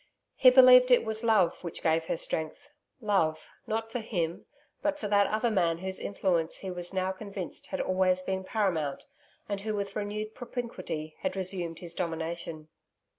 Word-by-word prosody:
He 255 Hz, -, +8 dB
believed 250 Hz, -1 st, +8 dB
that 250 Hz, -, +8 dB
it 235 Hz, -, -2 dB
was 220 Hz, +1 st, -3 dB
love 215 Hz, -7 st, +3 dB
which 170 Hz, -, -6 dB
gave 160 Hz, 0 st, +2 dB
her 165 Hz, -, -1 dB
strength 165 Hz, -, -3 dB, 0.3 s
love, 165 Hz, -8 st, +1 dB, 0.2 s
not 225 Hz, 0 st, -2 dB
for 245 Hz, -, -2 dB
him, 175 Hz, -7 st, -3 dB, 0.3 s
but 300 Hz, -1 st, 0 dB
for 215 Hz, -, -4 dB
that 200 Hz, -1 st, +4 dB
other 220 Hz, +2 st, 0 dB
man 170 Hz, -5 st, +2 dB
whose 190 Hz, +2 st, -3 dB
influence 175 Hz, -5 st, 0 dB
he 190 Hz, -, -5 dB
was 175 Hz, -1 st, -5 dB
now 190 Hz, 0 st, 0 dB
convinced 195 Hz, -2 st, -7 dB
had -, -, -4 dB
always 185 Hz, 0 st, +2 dB
been 190 Hz, 0 st, -2 dB
paramount, 180 Hz, -9 st, -1 dB, 0.4 s
and 200 Hz, -1 st, -3 dB
who 215 Hz, +1 st, -2 dB
with 200 Hz, -1 st, -4 dB
renewed 215 Hz, +1 st, -3 dB
propinquity 185 Hz, -11 st, -5 dB
had 280 Hz, -, -2 dB
resumed 180 Hz, -3 st, -3 dB
his 170 Hz, -1 st, -6 dB
domination. 165 Hz, -2 st, -4 dB
190 Hz, 175 wpm, -29 LUFS, 170-220 Hz, 0.4 s, He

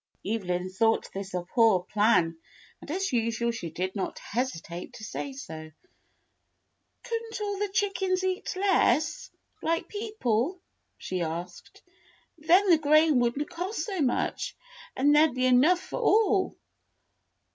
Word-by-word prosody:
Evelyn 185 Hz, -4 st, -2 dB
thought 225 Hz, +4 st, +1 dB
this 195 Hz, 0 st, -6 dB
a 180 Hz, -, -2 dB
poor 215 Hz, -1 st, +3 dB
plan, 205 Hz, -5 st, +2 dB, 0.5 s
and -, -, -12 dB
as 375 Hz, 0 st, -2 dB
usual 230 Hz, 0 st, 0 dB
she 205 Hz, -8 st, -5 dB
did 185 Hz, +5 st, -4 dB
not 195 Hz, -, -3 dB
hesitate 180 Hz, -8 st, -4 dB
to -, -, -11 dB
say 275 Hz, +5 st, -5 dB
so. 160 Hz, -, -8 dB, 1.3 s
"Could 465 Hz, -2 st, -2 dB
n't 445 Hz, -, -6 dB
all 405 Hz, -2 st, -3 dB
the 415 Hz, 0 st, -1 dB
chickens 385 Hz, -1 st, 0 dB
eat 375 Hz, 0 st, -2 dB
less, 365 Hz, -7 st, +2 dB, 0.3 s
like 330 Hz, +1 st, -1 dB
people.'*" 370 Hz, -, -1 dB, 0.4 s
she 185 Hz, -1 st, -4 dB
asked. 170 Hz, +2 st, -6 dB, 0.6 s
"Then 355 Hz, +5 st, +4 dB
the 325 Hz, -, +6 dB
grain 305 Hz, -1 st, +4 dB
would 240 Hz, +1 st, +1 dB
n't 295 Hz, -, -2 dB
cost 360 Hz, +4 st, -4 dB
so 385 Hz, -6 st, -3 dB
much* 260 Hz, -4 st, -1 dB, 0.4 s
and 290 Hz, +3 st, +4 dB
there 305 Hz, +2 st, +7 dB
'd 260 Hz, -, -8 dB
be 255 Hz, 0 st, +1 dB
enough 265 Hz, +8 st, +5 dB
for 375 Hz, -, -6 dB
all." 410 Hz, -3 st, +3 dB
270 Hz, 145 wpm, -28 LUFS, -, 1.3 s, there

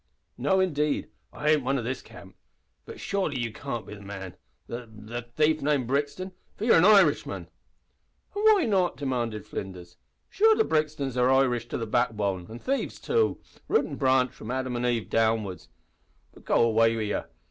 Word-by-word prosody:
"No 190 Hz, -, +1 dB
indeed, 150 Hz, -5 st, 0 dB, 0.2 s
I 150 Hz, +1 st, 0 dB
ain't 150 Hz, -3 st, +3 dB
one 135 Hz, +2 st, +1 dB
o' 125 Hz, -, -3 dB
this 125 Hz, +3 st, -3 dB
camp. -, -, -14 dB, 0.5 s
But -, -, -9 dB
surely 190 Hz, -9 st, -1 dB
you 115 Hz, -2 st, -3 dB
can't 120 Hz, -4 st, -5 dB
be -, -, -9 dB
the 105 Hz, -, -10 dB
man 95 Hz, -2 st, -8 dB, 0.3 s
the 120 Hz, -1 st, -7 dB
the 110 Hz, +3 st, -7 dB
thief 150 Hz, +6 st, +1 dB
named 140 Hz, -3 st, +1 dB
Brixton, 145 Hz, +8 st, -2 dB, 0.2 s
for 215 Hz, -, -4 dB
you're 230 Hz, -, +6 dB
an 170 Hz, -, +5 dB
Irishman." 195 Hz, -8 st, +4 dB, 0.9 s
"An' 410 Hz, -, -2 dB
why 430 Hz, -4 st, +5 dB
not?" 190 Hz, -5 st, +1 dB
demanded 120 Hz, -6 st, -2 dB
Flinders. 90 Hz, -4 st, -7 dB, 0.3 s
"Sure 440 Hz, +2 st, +4 dB
the 445 Hz, -, +3 dB
Brixtons 150 Hz, -, -1 dB
are 125 Hz, +1 st, +3 dB
Irish 125 Hz, -3 st, +2 dB
to -, -, -3 dB
the 115 Hz, -, -3 dB
backbone 105 Hz, -5 st, 0 dB
an' 115 Hz, -, -7 dB
thieves 270 Hz, -, -2 dB
too 455 Hz, -2 st, +1 dB, 0.3 s
root 445 Hz, -, +2 dB
an' -, -, -6 dB
branch 130 Hz, -2 st, +3 dB
from 110 Hz, -, -10 dB
Adam 130 Hz, 0 st, -2 dB
an' 120 Hz, +1 st, 0 dB
Eve 120 Hz, -3 st, 0 dB
downwards. 110 Hz, -4 st, 0 dB, 0.6 s
But -, -, -18 dB
go -, -, +3 dB
away 115 Hz, 0 st, +3 dB
wid 110 Hz, -2 st, -2 dB
ye. -, -, -1 dB
125 Hz, 180 wpm, -27 LUFS, 115-155 Hz, 0.9 s, you're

